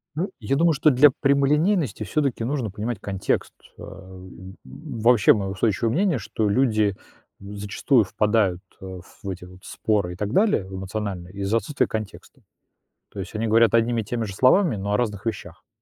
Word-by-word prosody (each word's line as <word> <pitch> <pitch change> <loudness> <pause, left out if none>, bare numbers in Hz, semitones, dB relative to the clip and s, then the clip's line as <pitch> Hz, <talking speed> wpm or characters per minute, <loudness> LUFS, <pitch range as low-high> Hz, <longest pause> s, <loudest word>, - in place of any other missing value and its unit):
Ну, 185 +6 -2
я 115 +5 -1
думаю, 165 +1 +3
что 150 +2 +3
для 140 +2 +6
прямолинейности 140 - +2
всё-таки 135 -3 -1
нужно 130 -3 -2
понимать 105 +3 -4
контекст. 95 -2 -2 0.3
Ам, 95 0 -11
вообще, 120 -6 +2
моё 95 -2 -3
устойчивое 110 +3 0
мнение, 180 -3 +1
что 110 0 -2
люди, 110 -4 +2 0.4
м, 100 +1 -10
зачастую 105 +4 +1
впадают, 100 -2 0 0.2
а, 95 -1 -8 0.2
в 100 - -5
эти 90 -1 -6
вот 90 +1 -16
споры 100 -5 -1
и - - -10
так 105 +4 -3
далее 195 - +2
в 95 - -8
эмоциональные 95 -2 -5
из-за 100 +3 0
отсутствия 145 +4 -1
контекста, 110 -2 -7 0.7
то 100 - -12
есть 95 +2 -6
они 110 +1 -2
говорят 115 +1 +4
одними 115 0 +2
и - - -11
теми 115 +2 -3
же 100 - -7
словами, 130 - +3
но 100 +1 -3
о 105 - +3
разных 105 -3 -3
вещах. 90 -7 -6
110 Hz, 175 wpm, -23 LUFS, 95-130 Hz, 0.7 s, для